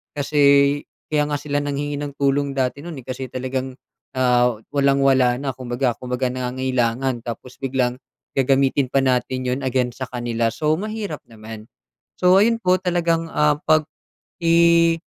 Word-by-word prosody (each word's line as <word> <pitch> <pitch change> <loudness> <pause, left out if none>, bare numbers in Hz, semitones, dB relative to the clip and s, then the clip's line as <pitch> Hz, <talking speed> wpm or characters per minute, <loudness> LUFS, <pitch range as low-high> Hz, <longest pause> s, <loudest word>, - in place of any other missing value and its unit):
Kasi 140 0 +3 0.3
kaya 150 -1 +2
nga 145 - 0
sila 145 0 -2
nanghingi 145 0 -3
ng 145 -1 -5
tulong 140 0 +1
dati 130 +1 -1
no'n 170 -1 -7
eh, - - -23
kasi 130 0 -5
talagang 130 0 -4 0.4
ah, 125 -2 +3 0.2
walang-wala 135 -3 +3
na 140 -1 -2
kumbaga 125 0 -1
kumbaga 125 0 -2
nangangailangan, 130 0 -1
tapos 120 +2 -7
biglang 130 -2 -1 0.4
gagamitin 135 0 +2
pa 135 - +3
natin 130 0 0
'yon 125 +2 -1
against 125 -1 -1
sa - - -5
kanila, 120 -2 -1
so 150 +6 -1
mahirap 210 -6 -4
naman. 110 -1 -11 0.5
So 180 +1 +5
ayun 230 +3 +4
po 185 0 +4
talagang, 170 -2 0
ah, 150 -1 +2
pag-i 165 +2 +2
135 Hz, 145 wpm, -21 LUFS, 125-150 Hz, 0.5 s, So